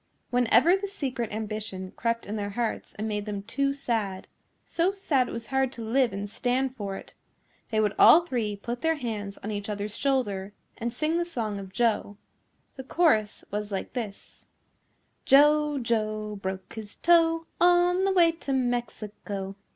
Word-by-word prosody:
Whenever 245 +7 +5
the 395 +1 -3
secret 260 - -3
ambition 215 -3 -5
crept 230 -1 -1
in 210 - -4
their 205 -1 -3
hearts 225 +2 -3
and 215 +2 -3
made 210 -1 -3
them 200 -1 -4
too 275 +6 0
sad, 225 -8 -2 0.4
so 345 +3 +1
sad 295 -10 +1
it - - -6
was 230 0 -5
hard 265 -1 +2
to 235 -3 -7
live 245 +1 +2
and 200 +1 -4
stand 250 +4 -1
for 200 -4 -4
it, - - -12 0.6
they 220 - 0
would 210 -1 +2
all 340 +2 +8
three 230 -9 -2
put 240 +5 -5
their 325 0 +2
hands 215 -7 -5
on 210 - -3
each 205 0 -4
other's 210 0 -4
shoulder 205 -8 -1 0.3
and 235 +1 -2
sing 310 +7 0
the - - +1
song 225 -12 -3
of 190 -1 -9
Joe. 220 -3 0 0.6
The 265 - -6
chorus 255 -8 +1
was 210 0 -3
like 195 - -4
this: 220 -6 -7 0.8
Joe, 295 +1 +5
Joe, 215 -3 -1
broke 190 -1 -5
his 215 -2 -7
toe, 330 -1 +3
On 355 +1 +4
the 390 - +2
way 345 -3 +5
to 325 -4 -4
Mexico. 215 -6 -3
230 Hz, 170 wpm, -27 LUFS, 205-275 Hz, 0.8 s, all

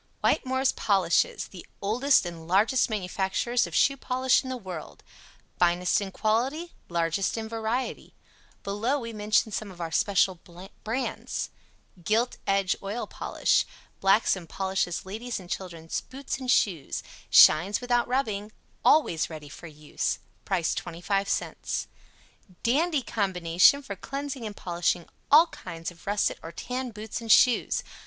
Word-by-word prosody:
WHITTEMORE'S 260 +1 +2
POLISHES 190 -5 +1
THE 180 -3 -10 0.2
OLDEST 240 +5 +3
AND 165 -2 -7
LARGEST 210 +9 +3
MANUFACTURERS 205 +4 0
OF - - -7
SHOE 275 0 +4
POLISH 255 0 +2
IN 260 - -7
THE 260 - -3
WORLD 185 -8 -8 0.6
FINEST 175 +2 +3
IN 195 -1 -4
QUALITY 260 - -1 0.2
LARGEST 170 +4 0
IN 220 -1 -4
VARIETY 225 +3 -3 0.5
Below 215 +8 0
we 230 -2 -6
mention 215 +1 +1
some 215 0 -4
of 180 -2 -13
our 165 -1 -4
Special 190 -1 +2 0.4
Brands: 240 +5 -3 0.5
"GILT 225 +7 +1
EDGE" 195 -1 +2
Oil 205 +5 -3
Polish - - +1 0.4
Blacks 195 +3 +4
and 175 -4 -10
polishes 190 -2 -2
ladies' 225 +5 -5
and 180 -2 -12
children's 170 -4 -4
boots 270 +1 -6
and 255 -1 -5
shoes; 175 - +1 0.3
SHINES 180 +7 +7
WITHOUT 245 -1 +1
RUBBING; 220 -5 -1 0.3
always 175 - +3
READY 155 -3 -9
for 170 - -10
use. 150 -1 -3 0.3
Price 180 -4 0
25c. 195 +3 -2 0.8
"DANDY" 295 +4 +2
Combination 190 +4 +3
for 200 - -6
cleansing 275 +2 -5
and 205 - -8
polishing 175 -1 -1 0.2
ALL 310 +4 +8
kinds 165 - -7
of 175 +1 -18
russet 205 +1 +1
or 165 - -8
tan 250 +8 -4
boots 220 +1 -6
and 225 -1 -1
shoes. 245 +2 +4
205 Hz, 135 wpm, -27 LUFS, 180-245 Hz, 0.8 s, ALL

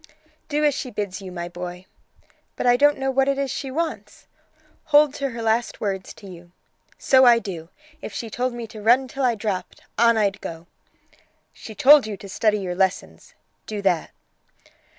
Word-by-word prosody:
"Do 300 0 +1
as 295 - +3
she 260 - -5
bids 205 -4 -5
you, 190 -1 -8
my 175 -1 -5
boy." 180 +1 -8 0.7
"But - - -4
I 245 0 +5
don't 290 +3 +4
know 270 0 -1
what 270 +1 +2
it 275 0 +1
is 275 -2 -2
she 270 - -4
wants." 320 +4 -5 0.6
"Hold 295 -1 +5
to 280 -1 -3
her 230 -2 -6
last 225 +2 0
words 195 -2 -3
to 200 - -13
you." 175 -1 -13 0.4
"So 260 -1 +4
I 240 -1 +7
do. 175 -7 -6 0.3
If - - -7
she 230 - -5
told 250 +3 -2
me 240 -1 -6
to 215 -1 -11
run 245 +5 +4
till 270 +2 -5
I 245 -2 +2
dropped, 205 -3 -5 0.2
on 235 -1 +5
I'd 205 -2 0
go." 165 0 -7 0.9
"She 220 - -11
told 280 -1 +6
you 210 -2 -5
to 200 - -11
study 210 +2 +1
your 185 -3 -4
lessons; 190 0 -2 0.3
do 215 -1 -4
that." 180 -4 +1
225 Hz, 190 wpm, -23 LUFS, 190-265 Hz, 0.9 s, I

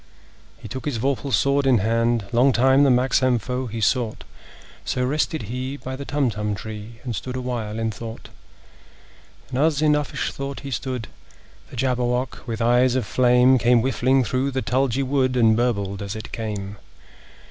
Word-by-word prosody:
He 115 -1 -10
took 130 +5 -6
his 145 -6 -1
vorpal 135 +3 -1
sword 140 +4 +2
in 130 -3 +5
hand: 115 +1 +1
Long 125 +3 +4
time 130 +3 +4
the 140 - +5
manxome 130 0 +3
foe 125 +3 -3
he 115 0 -5
sought— 115 0 0 0.6
So 125 - -1
rested 155 +3 -1
he 130 +3 -4
by 130 -1 -6
the 140 +1 -7
Tumtum 110 -8 -1
tree, 110 +2 -8
And 120 -3 -4
stood 125 +8 -5
awhile 120 -4 -3
in 115 0 -1
thought. 115 +1 -8 1.2
And 130 - -2
as 150 -1 +2
in 155 0 +3
uffish 150 -1 -2
thought 140 0 -6
he 140 - -7
stood, 125 -2 -3 0.6
The - - -11
Jabberwock, 125 0 -1
with 115 0 -2
eyes 125 +2 +3
of 130 -4 0
flame, 125 +3 +4
Came 120 0 +4
whiffling 130 +1 +2
through 130 +3 -1
the 130 -1 -2
tulgey 130 +1 +1
wood, 130 -1 +1
And 110 -2 +5
burbled 100 -5 -1
as 100 +1 -5
it 110 - -8
came! 105 -3 -5
125 Hz, 170 wpm, -23 LUFS, 115-130 Hz, 1.2 s, in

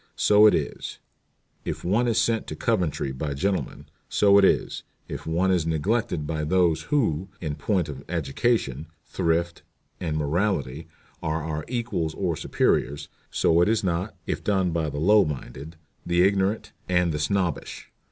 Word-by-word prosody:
So 105 +1 +6
it - - +5
is, - - -4 0.7
if - - -5
one 105 +8 +2
is 115 - +2
sent 115 -1 +1
to - - -5
Coventry 90 - 0
by 70 +2 -4
gentlemen. 95 +6 -2 0.2
So 100 -1 +5
it - - +4
is, - - +1 0.3
if - - -7
one 90 +4 +1
is 85 -3 +1
neglected 80 0 0
by 75 0 -2
those 85 0 +2
who, 95 - +1
in 75 -4 -3
point 85 +4 0
of 70 -2 -8
education, 80 - -1 0.2
thrift, 85 +1 -1 0.4
and 80 -4 -2
morality 80 -2 -1 0.3
are 80 0 -2
our 75 -1 -4
equals 115 -10 -2
or 90 -4 -1
superiors. 70 -1 0 0.2
So 85 +1 +3
it 90 - +3
is 110 -1 +1
not, 90 +2 -1
if - - -3
done 95 -4 +1
by 80 -2 -1
the 75 - -6
low 105 +7 +5
minded, 75 +2 -6 0.3
the 85 0 +2
ignorant, 100 +2 +1 0.2
and 90 -1 +2
the 75 - -3
snobbish. 85 +1 -2
85 Hz, 160 wpm, -25 LUFS, 75-100 Hz, 0.7 s, So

